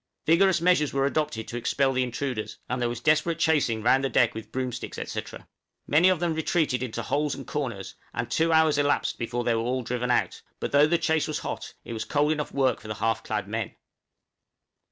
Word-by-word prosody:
Vigorous 180 +3 +4
measures 170 -4 +3
were 135 0 +2
adopted 140 -6 -1
to 120 - -5
expel 135 +3 +1
the 130 - +1
intruders, 125 -2 -3
and 125 0 -2
there 120 - +1
was 120 -1 -4
desperate 155 +4 +2
chasing 145 -10 +1
round 135 +3 +4
the 135 - +1
deck 120 - +3
with 110 -1 -8
broomsticks, 130 -2 -4
&c. - - -2 0.6
Many 165 +6 +5
of 185 -3 +2
them 170 -1 0
retreated 155 -5 0
into 115 -2 -4
holes 145 +4 0
and 135 - -8
corners, 120 -10 -4 0.2
and - - -4
two 165 +1 +2
hours 160 -2 +4
elapsed 145 0 +1
before 120 0 -2
they 120 - +2
were 115 - 0
all 125 +2 -1
driven 125 +1 -2
out; 125 - +1 0.2
but - - -3
though 145 +1 +5
the 170 +2 +2
chase 160 -2 +1
was 155 - -2
hot, - - -5
it - - -6
was 110 - -3
cold 150 +1 +1
enough 150 -1 -2
work 135 -2 +1
for 110 - -12
the 110 - -4
half 115 +2 0
clad - - -3
men. - - -4
135 Hz, 215 wpm, -26 LUFS, 120-155 Hz, 0.6 s, Many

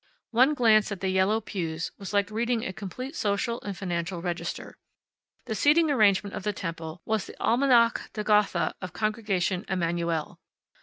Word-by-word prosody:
One 260 +6 +4
glance 220 -4 +4
at 200 - -4
the 190 - -1
yellow 190 +4 +2
pews 165 -7 -4
was 195 - -6
like 200 -1 +1
reading 230 +1 0
a 190 - -4
complete 255 - -7
social 215 +2 -1
and 200 -3 -6
financial 175 -1 -3
register. 170 -1 -4 0.7
The - - -3
seating 300 - +4
arrangement 205 -5 +3
of - - -4
the 210 +2 -1
temple 165 -2 -6
was 220 -2 -1
the - - -10
Almanach 235 -1 +3
de 210 - -3
Gotha 210 -6 +2
of 180 -2 -6
Congregation 210 -4 -1
Emanu 170 -2 0
el. 165 +1 -3
200 Hz, 165 wpm, -27 LUFS, 180-225 Hz, 0.7 s, One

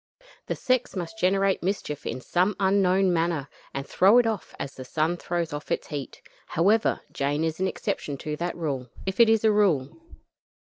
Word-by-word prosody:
The - - -1
sex 255 -3 0
must 185 +4 -5
generate 195 +1 +2
mischief 180 -6 -3
in 130 - -4
some 180 - +1
unknown 190 -1 +3
manner, 165 -4 0 0.2
and 135 0 -4
throw 200 +6 +5
it 245 - +5
off, 220 -4 -3
as 140 - -5
the 130 - -8
sun 155 +6 0
throws 170 -2 -3
off 145 0 -6
its - - -1
heat. 145 -3 -6 0.2
However, 200 +7 +2
Jane 145 +3 -1
is 160 0 -2
an 190 - +1
exception 145 -5 -3
to 150 +2 -4
that 175 +2 -3
rule 135 -7 -3 0.2
if 190 +2 -3
it 230 -1 +7
is 225 -1 +3
a 220 - +5
rule. 180 -11 +2
175 Hz, 185 wpm, -26 LUFS, 150-195 Hz, 0.2 s, it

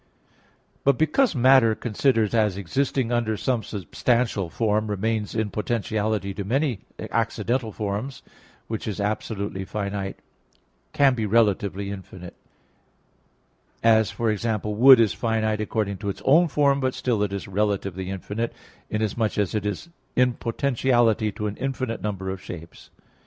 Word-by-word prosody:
But 140 -2 +3
because 165 - +2
matter, 130 -3 +5
considered 115 -1 +1
as 105 -4 +2
existing 125 +5 -1
under 115 -3 0
some 125 0 0
substantial 105 +1 -1
form, 110 +2 0
remains 105 +1 -2
in 110 -2 -1
potentiality 105 -2 -1
to 100 - -4
many 130 +2 0 0.3
accidental 115 +1 -1
forms, 105 +6 -4 0.4
which 110 -1 -5
is 105 -1 -3
absolutely 100 -1 -2
finite 100 -1 -4 0.7
can 140 -2 +4
be 110 -3 -2
relatively 100 -2 +1
infinite; 95 -2 -9 1.5
as, 110 -2 +5
for 115 -2 0
example, 105 0 -2
wood 130 +4 +8
is 110 -4 +3
finite 110 -2 0
according 105 -2 -2
to 100 +1 -4
its 100 - -6
own 165 +6 +5
form, 140 -2 +2
but 130 -1 -1
still 120 -5 0
it 105 -1 0
is 100 -1 -4
relatively 95 -2 -1
infinite, 105 +4 -3 0.4
inasmuch 110 +1 -1
as 100 -3 0
it 105 -1 -1
is 105 +11 -4 0.3
in 125 0 +3
potentiality 120 -3 +1
to 105 +1 -5
an 105 -1 -2
infinite 130 -3 -3
number 95 -3 -3
of 95 -1 -6
shapes. 80 -1 -10
110 Hz, 140 wpm, -24 LUFS, 100-120 Hz, 1.5 s, wood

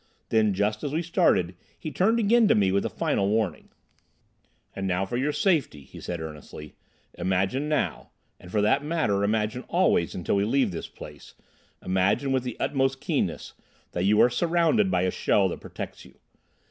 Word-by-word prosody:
Then, 110 -3 +2
just 105 +2 -1
as 145 - -3
we 165 +2 0
started, 160 - +2 0.2
he 155 - -6
turned 220 +8 +2
again 230 +1 +4
to - - +4
me 100 -2 +3
with 100 +1 +1
a - - -1
final 100 0 0
warning. 105 -6 -1 1.1
"And, 95 0 -3 0.2
for 120 - -4
your 135 +4 0
safety," 145 - 0
he - - -13
said 85 -1 -4
earnestly, 75 -1 -9 0.4
"imagine 95 +11 -1
now—and 140 -10 -4
for 105 - +1
that 110 +7 +2
matter, 145 -11 0
imagine 110 +3 0
always 175 - +2
until 90 +2 -1
we 100 - +2
leave 130 +1 +1
this 85 - -6
place—imagine 95 - -4
with 130 -1 +2
the 125 -2 -6
utmost 135 -1 0
keenness, - - -2 0.4
that 90 +1 -2
you 105 +2 +4
are 125 - +6
surrounded 170 - +2
by 90 - +1
a 95 - +1
shell 100 -2 +2
that - - -6
protects - - -8
you. - - -17
110 Hz, 170 wpm, -26 LUFS, 95-150 Hz, 1.1 s, are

